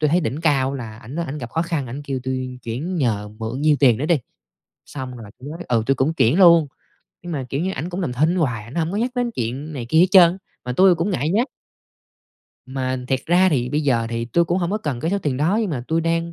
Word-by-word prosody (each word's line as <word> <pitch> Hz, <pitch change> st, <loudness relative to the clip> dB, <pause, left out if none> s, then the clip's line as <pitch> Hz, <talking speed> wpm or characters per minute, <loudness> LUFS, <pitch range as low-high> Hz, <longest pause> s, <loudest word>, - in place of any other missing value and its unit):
tui 155 Hz, -, +3 dB
thấy 175 Hz, +3 st, +3 dB
đỉnh 150 Hz, -2 st, -3 dB
cao 140 Hz, -4 st, +2 dB
là 115 Hz, -5 st, -7 dB
ảnh 120 Hz, +5 st, -9 dB
đó 170 Hz, -, -1 dB
ảnh 150 Hz, +2 st, -5 dB
gặp 120 Hz, -4 st, -7 dB
khó 165 Hz, -, 0 dB
khăn, 165 Hz, -6 st, -2 dB
ảnh 130 Hz, +5 st, -6 dB
kêu 135 Hz, -2 st, -3 dB
tui 130 Hz, -1 st, -4 dB
chuyển 140 Hz, +11 st, -4 dB
nhờ 110 Hz, -8 st, 0 dB
mượn 115 Hz, +4 st, -4 dB
nhiêu 150 Hz, 0 st, +4 dB
tiền 125 Hz, -6 st, +5 dB
đó 145 Hz, -, -2 dB
đi, 165 Hz, -1 st, +3 dB, 0.7 s
xong 130 Hz, -3 st, -7 dB
rồi 110 Hz, -4 st, -10 dB
tui 130 Hz, -, -9 dB
mới 165 Hz, +3 st, -8 dB
ừ, 115 Hz, -2 st, +2 dB
tui 135 Hz, -, +3 dB
cũng 135 Hz, +5 st, 0 dB
chuyển 140 Hz, +2 st, +3 dB
luôn. 170 Hz, -4 st, +7 dB, 0.6 s
Nhưng 175 Hz, 0 st, -6 dB
mà, 140 Hz, -4 st, -3 dB
kiểu 140 Hz, -, -2 dB
như, 185 Hz, +3 st, -1 dB
ảnh 155 Hz, +2 st, -4 dB
cũng 180 Hz, +2 st, -4 dB
làm 150 Hz, -9 st, -2 dB
thinh 155 Hz, +8 st, +1 dB
hoài, 125 Hz, -11 st, -1 dB
ảnh 115 Hz, +5 st, -12 dB
hông 165 Hz, -1 st, 0 dB
có -, -, -2 dB
nhắc 240 Hz, +3 st, 0 dB
đến 245 Hz, -1 st, 0 dB
chuyện 135 Hz, -, -4 dB
này 125 Hz, -5 st, -5 dB
kia 160 Hz, -, +3 dB
hết 180 Hz, -, +7 dB
trơn, 180 Hz, -1 st, +6 dB, 0.3 s
mà 125 Hz, -, -3 dB
tui 185 Hz, +7 st, +5 dB
cũng 170 Hz, +4 st, -1 dB
ngại 155 Hz, -5 st, -1 dB
nhắc. 230 Hz, -, +1 dB, 1.2 s
Mà 130 Hz, 0 st, -2 dB
thiệt 130 Hz, -1 st, +1 dB
ra 180 Hz, +3 st, +4 dB
thì 125 Hz, -6 st, 0 dB
bây 150 Hz, +3 st, 0 dB
giờ 125 Hz, -6 st, +1 dB
thì 115 Hz, 0 st, -2 dB
tui 145 Hz, +9 st, +2 dB
cũng 175 Hz, +2 st, 0 dB
hổng 175 Hz, 0 st, -1 dB
có 210 Hz, -, 0 dB
cần 145 Hz, -, -3 dB
cái 165 Hz, -, -1 dB
số 200 Hz, -, +1 dB
tiền 145 Hz, -8 st, -2 dB
đó, 165 Hz, +10 st, +1 dB
nhưng 210 Hz, -6 st, -1 dB
mà 125 Hz, -5 st, -3 dB
tui 160 Hz, +1 st, +1 dB
đang 165 Hz, +1 st, -1 dB
145 Hz, 270 wpm, -21 LUFS, 125-170 Hz, 1.2 s, luôn